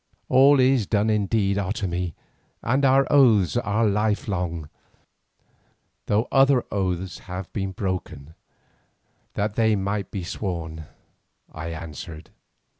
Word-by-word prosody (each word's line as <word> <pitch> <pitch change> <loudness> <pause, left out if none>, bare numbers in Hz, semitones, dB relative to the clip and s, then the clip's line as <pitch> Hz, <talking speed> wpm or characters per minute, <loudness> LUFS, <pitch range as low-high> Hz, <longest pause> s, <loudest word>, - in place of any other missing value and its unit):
"All 135 +2 +6
is 130 -5 +3
done 105 0 +1
indeed, 100 -1 +1
Otomie, 90 -4 -3 0.5
and 130 +4 +1
our 135 0 +5
oaths 115 -10 +5
are 115 -1 +1
lifelong, 100 -6 -1 1.4
though 105 +3 +1
other 135 -2 +4
oaths 95 -2 -2
have 90 0 -6
been 95 -2 -2
broken 90 -6 -5 1.0
that 100 0 -1
they 110 -1 +2
might 100 0 -2
be 95 -3 -5
sworn," 85 -4 -5 0.7
I 80 +1 -7
answered. 80 -1 -8
100 Hz, 110 wpm, -24 LUFS, 90-110 Hz, 1.4 s, All